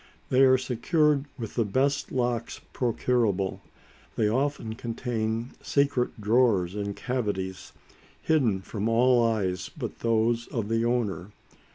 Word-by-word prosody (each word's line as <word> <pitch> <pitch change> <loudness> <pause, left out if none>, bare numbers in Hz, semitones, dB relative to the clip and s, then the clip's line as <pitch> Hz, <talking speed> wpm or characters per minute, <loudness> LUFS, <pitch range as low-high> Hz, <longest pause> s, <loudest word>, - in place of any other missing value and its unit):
They 130 - +4
are 130 -1 +6
secured 140 +4 +1
with 115 -4 -6
the 115 - +1
best 135 +7 0
locks 120 -2 -1
procurable. 115 -5 0 0.5
They 110 - +2
often 130 -1 -1
contain 115 0 -3
secret 140 -4 0
drawers 105 -5 +2
and 100 -1 -3
cavities, 100 -7 -3 0.5
hidden 120 -12 +1
from 105 +3 -3
all 120 +1 +4
eyes 95 -5 -1
but - - -7
those 115 +1 +1
of 110 -3 -3
the 115 0 +1
owner. 105 -5 -1
115 Hz, 125 wpm, -27 LUFS, 105-125 Hz, 0.5 s, are